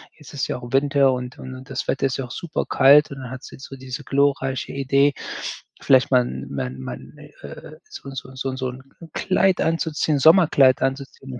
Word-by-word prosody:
Jetzt 150 - -15
ist 140 - -2
ja - - -3
auch 120 0 -10
Winter 140 0 +3
und 125 +3 -6
und 130 0 -8
und 130 0 -12
das - - -4
Wetter 135 - 0
ist 130 - -3
ja 135 - -4
auch 120 - -12
super 170 +2 -4
kalt 140 +2 +5
und 140 - -7
dann 125 -1 -8
hat 130 - -8
sie - - -11
so 135 - -9
diese 130 +2 -7
glorreiche 135 -2 0
Idee, 140 +1 +2 0.7
vielleicht 130 -1 +4
mal 125 -2 +4 0.2
mal 65 - -3
mal, 65 -1 -7
'n - - -15
äh, - - -12
so 140 - -10
so 130 0 -8
so 130 0 -3
so 130 -1 -2
‘n 130 +1 -12 0.3
Kleid 190 0 +1
anzuziehen, 160 -2 0
Sommerkleid 145 -5 +5
anzuziehen, 135 -1 -4
135 Hz, 200 wpm, -22 LUFS, 130-145 Hz, 0.7 s, kalt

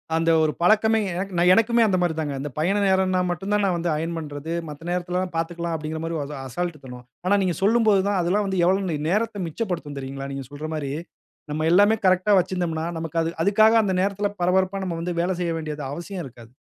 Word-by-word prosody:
அந்த 165 0 +1
ஒரு 155 - +2
பழக்கமே 220 +4 +4 0.2
எனக்கு 190 +1 -4 0.2
எனக்குமே 230 +3 +3
அந்த 185 -2 +2
மாரி 175 -2 +1
தான்ங்க. 145 -3 -2
அந்த 145 +2 -4
பயண 180 +6 +1
நேரம்னா 190 -1 +2
மட்டும் 190 +3 -4
தான் 210 0 +2
நான் 185 -2 +1
வந்து 170 0 -1
அயன் 165 +2 -3
பண்றது. 150 +1 -5 0.2
மத்த 150 +3 -9
நேரத்திலல்லாம் 180 0 -2
பார்த்துக்கலாம் 170 0 -2
அப்டிங்கிற 155 0 -4
மாரி 165 -1 -2
ஒரு 145 +1 -6
அசால்ட் 170 +2 -4
தனம். 125 -1 -10 0.2
ஆனா, 200 +2 +4
நீங்க 175 -3 0
சொல்லும்போது 215 -2 +4
தான் 195 -2 +1
அதெல்லாம் 200 +4 +1
வந்து 190 -2 0
எவ்ளோ 185 -4 +1
நேரத்தை 210 +2 0
மிச்சப்படுத்தும் 165 -6 -4
தெரியுங்களா? 135 +1 -6
நீங்க 135 -1 -5
சொல்ற 150 +2 -6
மாரி. 140 -3 -3 0.6
நம்ம 155 +1 -1
எல்லாமே 205 +4 +5
கரெக்ட்‌டா 185 +3 +4
வச்சிருந்தோம்னா, 175 -3 -2
நமக்கு 165 0 -5
அதுக் 165 0 -3
அதுக்காக 215 +3 +5
அந்த 190 -2 0
நேரத்தில 200 +1 0
பரபரப்பா 190 +2 +1
நம்ம 170 -2 -3
வந்து 175 +1 -2
வேலை 185 +2 0
செய்ய 170 -1 0
வேண்டியது 150 -2 -5
அவசியம் 175 +4 -6
இருக்காது. 120 -3 -13
175 Hz, 200 wpm, -24 LUFS, 155-195 Hz, 0.6 s, எல்லாமே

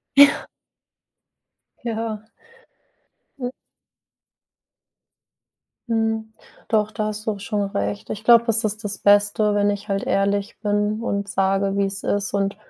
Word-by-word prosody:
Ja. 285 0 +6 1.4
Ja. 220 -2 -3 1.1
Hm. 245 -2 -2 2.4
Mhm. 225 -1 -1 0.4
Doch, 215 -1 +2
da 215 0 -2
hast 215 0 -5
du 220 - +1
auch 200 - -8
schon 205 0 -2
recht. 100 - -3
Ich 215 +1 -5
glaube, 235 0 +7
es 225 0 +2
ist 215 +1 -2
das 205 0 -3
Beste, 205 +1 +3
wenn 205 0 +3
ich 205 +1 -5
halt 195 0 -1
ehrlich 200 +1 0
bin 210 +1 0
und 200 -3 -2
sage, 195 0 +1
wie 200 - +2
es 195 0 -5
ist 205 0 -1
und 200 0 0
205 Hz, 130 wpm, -22 LUFS, 200-220 Hz, 2.4 s, glaube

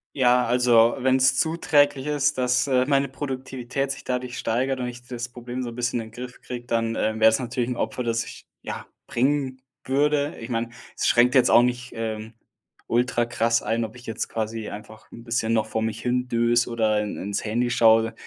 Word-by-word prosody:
Ja, 125 -2 +4
also 120 -1 +4
wenn's 130 +1 +3
zuträglich 145 -4 +2
ist, 145 -1 +1
dass, 125 +1 +2
äh, 130 -2 +3
meine 140 0 +2
Produktivität 130 -1 -4
sich 140 - -5
dadurch 125 -1 -3
steigert 130 +4 -1
und 125 - -2
ich 120 0 -8
das 120 -1 -5
Problem 125 +1 -6
so 120 - -4
'n 115 - -9
bisschen 120 -1 -1
in 110 0 -10
Griff 125 +2 -9
kriege, 120 -1 -7
dann, 115 -1 0
äh, 110 0 -1
wär's 110 +2 +5
natürlich 125 -1 -2
'n 125 - -2
Opfer, 125 - -2
das 115 -1 0
ich - - -11 0.2
ja, - - -6 0.2
bringen 130 0 0 0.2
würde. 145 +2 +1
Ich 115 - -8
meine, 115 -1 -1 0.3
es - - 0
schränkt 120 +1 +4
jetzt 130 -3 +5
auch 120 - +7
nicht, 125 0 -2
ähm, 110 0 -4 0.5
ultra 120 0 +1
krass 115 -1 +1
ein, 115 0 0
ob 110 - -10
ich 120 +1 -13
jetzt 115 - -4
quasi 110 0 -3
einfach 105 +1 -11
'n 115 - -11
bisschen 115 -1 -1
noch 110 -1 +2
vor 110 0 -3
mich 110 0 -3
hindöse 120 -1 +1
oder 110 -3 +1
in 105 - -4
ins 100 +1 -3
Handy 120 +3 0
schaue. 115 -1 +4
120 Hz, 195 wpm, -24 LUFS, 115-130 Hz, 0.5 s, auch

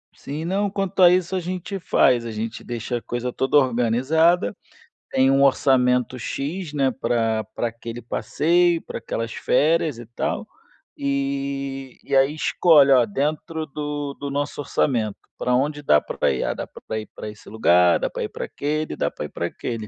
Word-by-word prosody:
Sim. 150 +3 -6
Não, 200 +3 0
quanto 195 -1 -2
a 180 - +9
isso 180 +1 +1
a - - +1
gente 185 +2 -4
faz. 125 -8 +3
A 115 - -4
gente 110 +1 -5
deixa 120 +1 -3
a - - -7
coisa 120 +2 -3
toda 135 +2 +2
organizada. 130 - +2 0.5
Tem 130 0 +3
um 135 0 +4
orçamento 125 -2 +3
"x", 150 +8 -4
né, 135 -2 +2
pra 115 -3 0
pra 120 - -1
aquele 115 +1 -7
passeio, 170 +8 +1
pra - - -7
aquelas 115 0 -4
férias, 155 -1 +1
e 120 - -9
tal. - - -2 0.5
Eh, 140 -1 -3
e 140 - -1
aí, 135 +2 +4
escolhe: 155 -2 +4
"Ó, 125 -2 +5
dentro 155 +7 -2
do 145 -1 -4
do 140 - -4
nosso 145 +1 -2
orçamento, 115 -7 0 0.2
pra 125 - 0
onde 145 +4 0
dá 75 - +5
pra - - -1
ir?". 65 - -1
"Ah, - - 0
dá - - -5
pra 110 - -7
ir 110 - -9
pra 105 - -7
esse 105 - -13
lugar, 90 -5 +4
dá - - -1
pra - - -4
ir - - -3
para - - -5
aquele, 155 +2 -3
dá - - -1
pra - - -6
ir - - -8
para - - -3
aquele". 115 -3 -5
135 Hz, 185 wpm, -23 LUFS, 120-155 Hz, 0.5 s, a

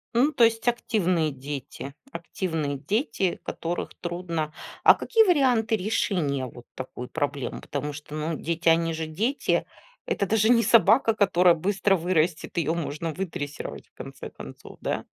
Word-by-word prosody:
Ну, 275 +6 +4
то 240 - +3
есть 225 +1 +3
активные 185 -9 +1
дети. 140 0 -7 0.2
Активные 165 - -3
дети, 200 - -1
которых 170 +1 -4
трудно 170 -3 -3 0.3
А - - +9
какие 450 -1 +3
варианты 255 - +3
решения 180 - 0
вот 120 0 -11
такой 125 -1 -7
проблемы? 145 -3 -3
Потому 145 +1 -4
что, 150 0 -10
ну, 155 +1 -2
дети- 170 +1 0
они 165 0 +3
же 160 0 -3
дети, 225 - 0 0.4
это 200 - -1
даже 220 +2 +3
не 235 -1 +6
собака, 225 0 +5
которая 180 -4 +4
быстро 195 +3 +1
вырастет, 170 -2 0
ее 165 0 +1
можно 165 0 -3
выдрессировать, 155 -5 -5
в - - -60
конце - - -8
концов, - - -11
да? - - -2
170 Hz, 145 wpm, -26 LUFS, 155-215 Hz, 0.4 s, А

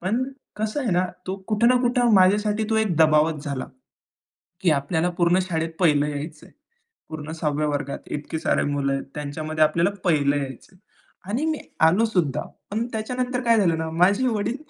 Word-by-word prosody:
पण 210 +8 0 0.3
कसं 215 +6 -2
आहे 245 -7 -1
ना? 180 +1 +2 0.2
तो 190 - -3
कुठे 215 +2 +2
ना 250 +1 +5
कुठं 245 -1 +2
माझ्यासाठी 205 +3 +3
तो 220 - +2
1 185 -7 -1
दबावच 155 -1 +3
झाला. 140 -3 -4 1.0
की 175 - +3
आपल्याला 160 +5 -1
पूर्ण 175 +2 +4
शाळेत 165 -3 -2
1लं 150 -4 +3
यायचं 150 +1 -6
आहे. - - -22 0.6
पूर्ण 155 0 -6
6व्या 150 -2 -1
वर्गात. 145 -1 -3
इतके 150 +2 -4
सारे - - +1
मुलं 140 -1 0
आहेत. 135 - -2
त्यांच्यामध्ये 155 +2 -1
आपल्याला 165 +4 +2
1लं 145 -5 +2
यायचं 135 +5 -6
आहे. 180 - -24 0.5
आणि 260 +9 -1
मी 315 -1 0 0.3
आलो 195 +8 +3
सुद्धा. 180 - 0 0.3
पण 220 +3 -1
त्याच्यानंतर 250 +3 -2
काय 230 -1 +4
झालं 170 -5 +2
ना 160 0 -3
माझे 195 +9 +3
वडील 225 0 -1
170 Hz, 175 wpm, -23 LUFS, 150-215 Hz, 1.0 s, ना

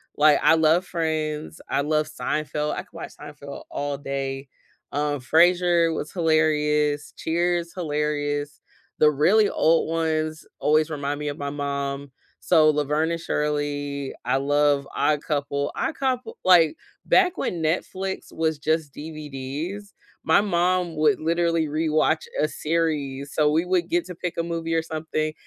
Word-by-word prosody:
like, 150 -1 +5
I 160 - +5
love 160 +3 +3
Friends. 155 -2 -3
I - - 0
love 155 +1 0
Seinfeld. 150 0 -2
I - - -4
could - - -30
watch 165 - -7
Seinfeld 145 -1 -9
all 145 0 -3
day, 135 -1 -4 0.5
um, 145 0 0
Frasier 170 +3 +3
was 155 - -5
hilarious. 150 -3 +1
Cheers, 170 +1 -1
hilarious. 145 -3 -2 0.4
The 150 - +6
really 195 +9 +4
old 165 0 +2
ones 155 -1 -1
always 155 +1 +3
remind 145 -1 -3
me 150 0 -2
of 145 - -5
my 140 0 -3
mom, 140 -1 -3 0.3
so 155 -1 +4
Laverne 150 +1 +1
and 170 - -2
Shirley, 145 -2 -2
I 125 +2 +2
love 145 0 +2
Odd 150 -1 +1
Couple. 140 -1 -2
Odd 320 - -2
Coup 260 -2 +1 0.3
like 170 -4 +6 0.3
back 365 -1 +4
when 170 -3 -2
Netflix 190 +4 -2
was 160 -2 -1
just 155 -2 -1
DVDs, 155 +6 -6 0.3
my 160 - +4
mom 180 -3 +1
would 155 +6 +3
literally 165 0 +1
rewatch 155 +1 +1
a 155 - +3
series, 150 -4 -2
so 150 -1 +3
we 160 +3 +1
would 180 -1 0
get 175 0 +1
to 180 - -7
pick 175 0 -5
a 165 - 0
movie 165 -1 -2
or 165 - +1
something, 155 -1 -3
155 Hz, 150 wpm, -24 LUFS, 145-165 Hz, 0.5 s, The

